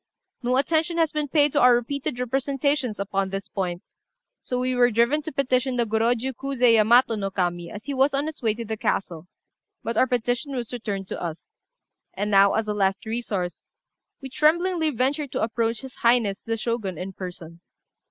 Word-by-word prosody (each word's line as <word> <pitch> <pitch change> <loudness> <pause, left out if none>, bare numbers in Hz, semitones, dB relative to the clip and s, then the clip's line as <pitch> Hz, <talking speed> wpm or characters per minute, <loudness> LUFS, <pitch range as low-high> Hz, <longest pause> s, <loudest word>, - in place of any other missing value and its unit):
No 250 +1 +1
attention 320 +4 +1
has 325 -2 +2
been 300 -1 -1
paid 290 0 +3
to - - +2
our 250 0 +7
repeated 245 +1 -2
representations 270 -1 0
upon 195 -1 -1
this 195 0 -5
point; 180 -3 -3 0.6
so 250 - -3
we 255 0 0
were 245 -1 +4
driven 235 +6 +2
to 315 - -6
petition 260 -2 0
the 240 -1 +1
Gorôjiu 230 +4 0
Kuzé 255 -2 +2
Yamato 230 +2 +5
no 200 -3 -2
Kami 175 -3 -2
as 210 +3 -9
he 285 - -4
was 270 +2 +3
on 280 +1 -1
his 315 -1 -6
way 220 -3 +1
to 230 0 -6
the 220 +1 -3
castle, 175 -5 -2 0.6
but 230 0 -3
our 260 - +4
petition 245 +3 -1
was 245 -1 -4
returned 205 -5 -4
to - - -5
us. 165 -2 -6 0.6
And 210 +1 -2
now, 195 0 +5
as 220 0 0
a 210 - 0
last 195 0 0
resource, 215 -6 -3 0.6
we 265 - -6
tremblingly 330 +3 +2
venture 280 +3 0
to - - -2
approach 230 0 -1
his 265 -2 -9
Highness 235 -4 +2
the 225 0 -3
Shogun 215 -6 -3
in 185 +3 -6
person. 175 -3 -8
235 Hz, 190 wpm, -24 LUFS, 205-270 Hz, 0.6 s, our